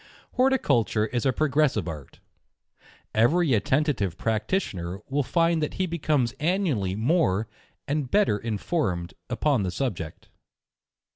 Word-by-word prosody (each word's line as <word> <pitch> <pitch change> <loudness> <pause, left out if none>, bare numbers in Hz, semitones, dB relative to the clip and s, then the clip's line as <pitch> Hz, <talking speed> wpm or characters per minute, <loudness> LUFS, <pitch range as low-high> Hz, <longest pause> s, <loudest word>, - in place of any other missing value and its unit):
Horticulture 140 - +2
is 120 +3 -1
a - - +4
progressive 140 - +1
art. 75 -4 -8 0.9
Every 140 +7 +3
attentive 110 - +1
practitioner 105 - -2
will 140 +1 0
find 165 +3 +1
that 150 - -2
he 185 - 0
becomes 150 -8 0
annually 150 - 0
more 115 - +1 0.4
and 145 -2 -1
better 200 - +3
informed 100 - -2 0.2
upon 145 -7 +1
the 95 - -1
subject. 90 - -4
130 Hz, 115 wpm, -26 LUFS, 105-155 Hz, 0.9 s, a